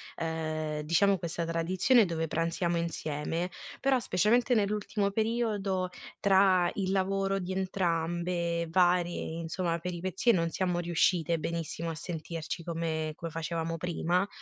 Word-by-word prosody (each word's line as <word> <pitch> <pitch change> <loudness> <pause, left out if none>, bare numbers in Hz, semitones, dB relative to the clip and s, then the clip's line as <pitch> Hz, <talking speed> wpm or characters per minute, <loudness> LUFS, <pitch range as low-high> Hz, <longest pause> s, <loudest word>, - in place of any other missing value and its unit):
ehm, 155 -2 -2
diciamo 185 +5 +3
questa 170 -1 -3
tradizione 180 +8 +3
dove 165 -2 -1
pranziamo 170 +2 0
insieme, 165 +1 -2 0.3
però 270 -1 +3
specialmente 230 +5 +2
nell'ultimo 205 -1 0
periodo 210 -4 0 0.3
tra 190 -2 +5
il 190 -2 -1
lavoro 195 0 +1
di 185 0 -4
entrambe, 170 -2 -1
varie, 175 -1 +3 0.2
insomma, 170 +1 -1
peripezie, 180 +6 0
non 165 -2 +1
siamo 180 0 0
riuscite 170 -1 +2
benissimo 165 0 -3
a - - -5
sentirci 165 0 -5
come 160 -2 -2
come 165 -1 -5
facevamo 165 +1 -3
prima. 180 +2 0
175 Hz, 120 wpm, -30 LUFS, 165-190 Hz, 0.3 s, tra